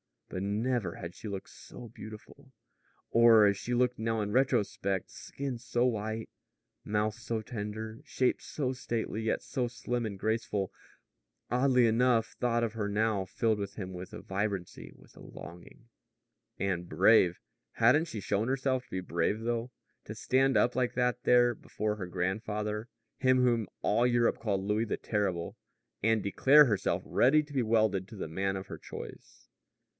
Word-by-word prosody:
But 95 - -4
never 105 -1 -1
had 85 0 -7
she 110 - -9
looked 100 -2 -6
so 120 - -11
beautiful 115 +5 -12 0.6
or 115 -2 +7
as 100 -1 +4
she 120 - -4
looked 125 0 +1
now 115 0 0
in 105 0 -2
retrospect 110 -6 0
skin 135 -3 -6
so 120 +1 0
white, 110 -1 -2 0.6
mouth 105 0 0
so 115 -1 -3
tender, 110 0 -6
shape 130 - 0
so 135 -4 -2
stately, 115 -3 -3
yet 110 - -1
so 125 -2 -2
slim 120 0 -3
and 100 -3 -5
graceful. 105 -2 -1 0.8
Oddly 125 0 +4
enough, 115 0 +2
thought 120 -1 +1
of 115 -2 -1
her 110 -3 -2
now 105 -1 0
filled 105 0 0
him 95 -3 -6
with 90 0 -8
a - - -7
vibrancy, 95 -2 -4
with - - -20
a - - -12
longing. 90 +7 -12 0.7
And 90 -2 -2
brave! 90 +1 +4 0.3
Hadn't 130 +8 +4
she 110 -10 -6
shown 105 +3 0
herself 130 -1 0
to - - -28
be 95 - -3
brave 90 +4 -1
though 120 +1 -2 0.4
to - - -7
stand 135 +1 +2
up 120 - +3
like 125 -1 0
that 125 0 0
there 120 0 +5
before 105 -1 -3
her 95 -3 -5
grandfather, 105 +4 -2 0.3
him 130 -1 +3
whom 120 -4 +2
all 120 +4 +3
Europe 120 -1 +2
called 100 -4 -1
Louis 105 +3 0
the - - -2
Terrible, 95 -5 -2 0.4
and 110 0 +2
declare 135 +9 +6
herself 105 -7 0
ready 150 +5 +4
to 145 0 -13
be 135 - +2
welded 110 -4 +2
to 110 - -11
the 95 -6 -5
man 95 +4 -1
of 95 0 -6
her - - -8
choice! - - -10
110 Hz, 165 wpm, -30 LUFS, 100-120 Hz, 0.8 s, or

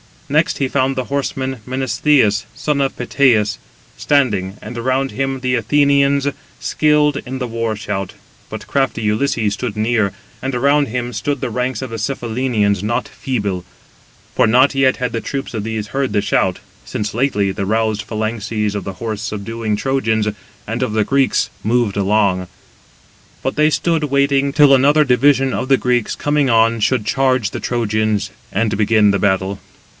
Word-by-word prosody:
Next 155 +5 +1
he 135 -2 0
found 130 +1 +1
the 130 - -1
horseman 135 -1 -2
Menestheus, 130 -3 +2
son 150 -2 -1
of 135 - -1
Peteus, 110 -7 +2 0.4
standing, 105 -10 +1
and 120 +3 -8
around 130 +3 0
him 135 0 -2
the 130 -1 0
Athenians 140 +3 +2 0.3
skilled 150 -1 +2
in 130 +1 -5
the 130 - -3
war 115 -2 -2
shout: 95 -2 -4 0.4
but - - -7
crafty 135 -4 -1
Ulysses 105 0 0
stood 110 0 -4
near; 110 -2 +1 0.3
and 135 -1 -3
round 140 +3 +3
him 120 +1 -3
stood 145 -1 -2
the - - -2
ranks 125 +1 -2
of 130 - -5
the 115 - -5
Cephallenians 110 -4 0
not 110 +3 -2
feeble; 100 -8 -3 0.7
for - - +3
not 125 +6 +4
yet 135 -1 +2
had 125 0 -2
the 115 - -2
troops 135 -2 -5
of 110 -2 -3
these 110 -2 -3
heard 135 +3 -2
the 105 - +2
shout, - - 0 0.3
since 105 0 -4
lately 105 -5 +1
the 100 +1 -3
roused 110 0 0
phalanxes 110 -1 -2
of 100 -3 -4
the 95 - -4
horse 110 +1 -5
subduing 110 0 -3
Trojans 110 -3 0 0.4
and 115 +3 -4
of 125 -4 -1
the 110 -1 +2
Greeks 135 +4 +1
moved 115 -2 0
along; 100 -2 +1 1.0
but 130 - -2
they 150 0 +4
stood 160 0 0
waiting 140 0 +1
till 145 -2 +6
another 145 +3 +5
division 135 0 +3
of - - -2
the 135 0 +4
Greeks, 125 -3 0
coming 145 -2 +1
on, 115 0 +3
should 110 +1 +1
charge 130 -2 +1
the - - -5
Trojans 110 -3 -1 0.2
and 110 +1 0
begin 105 -1 +4
the 100 - 0
battle. 95 0 0
120 Hz, 165 wpm, -18 LUFS, 105-135 Hz, 1.0 s, till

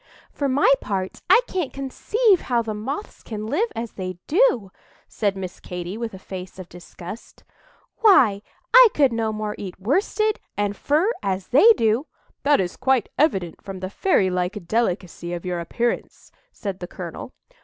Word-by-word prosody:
"For 280 -2 -2
my 275 +2 +4
part, 190 -2 -3
I - - +7
can't 360 - -3
conceive 380 - +1
how 240 -2 0
the 220 -1 -4
Moths 265 - -5
can 215 -2 -6
live 365 - 0
as 230 0 -4
they 185 -2 -6
do," 295 - +2 0.4
said 200 -3 -1
Miss 185 -1 -6
Katy, 180 +1 -6
with 225 -2 -5
a - - -8
face 185 -1 -8
of 185 -2 -8
disgust. 175 +4 -11 0.5
"Why, 260 - +5 0.3
I - - +10
could 275 -5 +4
no 225 -1 0
more 215 -1 -3
eat 190 -3 -7
worsted 400 - +1 0.2
and 205 0 0
fur, 310 - +1
as 190 -2 -2
they 340 - +7
do—" 230 - +1 0.3
"That 290 0 +4
is 180 -2 -2
quite 260 -4 +1
evident 190 - +1
from 195 -1 -7
the 185 +1 -5
fairy 200 - +2
like 180 +1 -2
delicacy 180 -4 -1
of 175 0 -5
your 180 -1 -2
appearance," 235 +8 -3 0.2
said 195 -3 -5
the 180 - -6
colonel. 180 +7 -8
215 Hz, 165 wpm, -23 LUFS, 185-280 Hz, 0.5 s, I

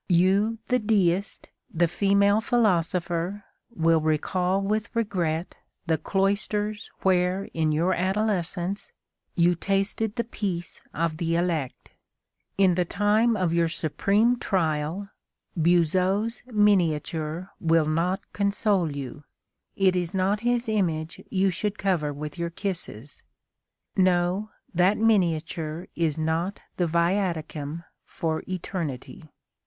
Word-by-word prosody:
You, 195 +6 +3
the 250 0 +3
deist, 200 -3 +1 0.2
the 170 +1 +2
female 200 +3 +3
philosopher, 180 -4 0 0.3
will 165 -7 +2
recall 180 +5 +1
with 215 +3 -1
regret 180 -7 -1 0.3
the 160 -2 +1
cloisters 205 +4 -1
where 185 0 +2
in 160 -1 +1
your 170 +5 +2
adolescence 190 -1 -1 0.4
you 175 0 +4
tasted 195 +4 -1
the 235 - 0
peace 185 -7 -3
of 165 -1 -1
the 165 0 0
elect. 170 -6 -2 0.7
In 190 -2 +5
the 180 +1 +2
time 210 +5 +2
of 180 -3 0
your 170 -1 +3
supreme 200 +9 +1
trial 165 +1 -1 0.5
Buzot's 180 +6 +2
miniature 175 - +1
will 165 -2 +3
not 170 +5 0
console 200 -3 +1
you; 140 +1 -6 0.5
it 190 -2 +3
is 175 +1 -2
not 190 +2 +1
his 240 +1 0
image 170 -7 -1
you 190 0 +2
should 210 +3 -2
cover 175 -7 0
with 150 +3 -7
your 170 0 -1
kisses. 170 - -4 0.7
No; 185 +2 +2 0.2
that 180 +4 +3
miniature 170 -6 0
is 165 -3 0
not 165 +5 -1 0.2
the 175 - +1
viaticum 170 -3 -1 0.2
for 160 -1 -3
eternity. 165 -5 -5
180 Hz, 115 wpm, -26 LUFS, 165-200 Hz, 0.7 s, In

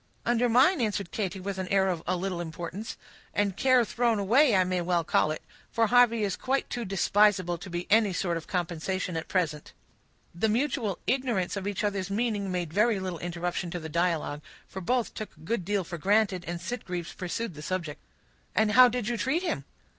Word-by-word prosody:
"Under 240 +1 +2
mine," 260 +7 +5
answered 205 -5 -1
Katy, 195 -3 -3
with 190 0 -4
an 185 - -3
air 190 0 +3
of 175 -4 -1
a 185 - +1
little 180 -1 -3
importance. 175 +5 -6 0.4
"And 200 -2 +1
care 255 +2 +4
thrown 235 0 +1
away 235 +5 +4
I 185 - +5
may 180 0 -1
well 175 -1 +1
call 155 - +2
it; 155 - -4 0.3
for 230 0 +2
Harvey 230 -1 +4
is 195 -2 0
quite 270 +1 -1
too 240 -1 -3
despisable 195 -2 +2
to 185 - -9
be 175 0 -3
any 215 -2 +5
sort 175 -1 -1
of 165 - -6
compensation 180 +1 -2
at 165 - -3
present." 160 -5 -1 0.6
The 190 +6 0
mutual 235 -3 0
ignorance 245 -9 0
of 200 0 -4
each 205 0 -2
other's 195 -3 -1
meaning 205 -2 -1
made 175 -3 -3
very 215 +1 +3
little 185 -3 -4
interruption 175 0 -3
to 175 +1 -4
the 160 -1 -7
dialogue, 165 -3 0 0.3
for 190 - -7
both 245 +5 0
took 215 -6 -7
a - - -18
good 200 +4 -2
deal 200 +1 0
for 170 0 -7
granted, 200 0 +2
and 170 0 -3
Sitgreaves 180 -4 -5
pursued 185 +3 -4
the 150 - -9
subject. 170 -2 -4 0.5
"And 220 -1 +3
how 250 +2 +8
did 240 -3 -3
you 240 -1 -1
treat 270 - 0
him?" - - -2
195 Hz, 200 wpm, -28 LUFS, 175-225 Hz, 0.6 s, how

